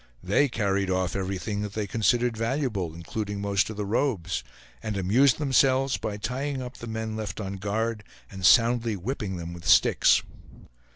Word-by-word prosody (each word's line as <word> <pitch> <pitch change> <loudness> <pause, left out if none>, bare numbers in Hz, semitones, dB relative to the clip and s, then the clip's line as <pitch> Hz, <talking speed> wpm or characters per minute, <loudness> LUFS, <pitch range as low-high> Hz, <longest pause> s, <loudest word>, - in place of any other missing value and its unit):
They 120 +10 +2
carried 100 -4 0
off 95 -1 0
everything 100 +2 -3
that 105 -1 -5
they 105 0 -2
considered 115 +4 +1
valuable, 115 - -2
including 100 +4 -4
most 100 0 +1
of 110 - -7
the 105 - -2
robes; 100 - -1 0.4
and 105 -2 -3
amused 120 +8 +3
themselves 135 -2 +2
by 105 -2 -4
tying 135 +5 -3
up 125 -1 -7
the 115 - -8
men 110 -1 -4
left 110 -1 -5
on 100 -1 -4
guard 105 +2 -2 0.3
and 95 -1 -8
soundly 115 +2 +4
whipping 100 -1 -4
them 85 0 -6
with 85 -2 -9
sticks. - - +5
105 Hz, 165 wpm, -26 LUFS, 95-120 Hz, 0.4 s, sticks